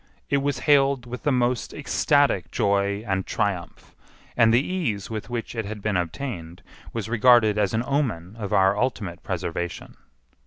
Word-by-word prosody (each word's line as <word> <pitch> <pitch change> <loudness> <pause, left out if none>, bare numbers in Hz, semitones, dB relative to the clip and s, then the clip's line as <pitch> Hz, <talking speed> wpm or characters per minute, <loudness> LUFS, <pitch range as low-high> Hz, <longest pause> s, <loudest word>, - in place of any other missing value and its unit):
It 140 - +4
was 140 -2 -1
hailed 140 -3 +4
with 125 +1 -7
the 145 - +1
most 125 -1 0
ecstatic 145 - +2
joy 100 +1 0
and 95 -2 -1
triumph, 100 -5 -3 0.4
and 115 -2 +5
the 120 +5 +3
ease 125 - -2
with 110 +1 -5
which 120 -2 -4
it 115 -2 -3
had 105 +1 -6
been 105 0 -1
obtained 85 - -4 0.3
was 115 -2 -4
regarded 115 -2 +4
as 105 +1 +1
an 115 - 0
omen 110 - -1
of 100 -3 -4
our 95 +1 +4
ultimate 105 -7 -2
preservation. 85 +1 -4
110 Hz, 160 wpm, -24 LUFS, 100-125 Hz, 0.4 s, and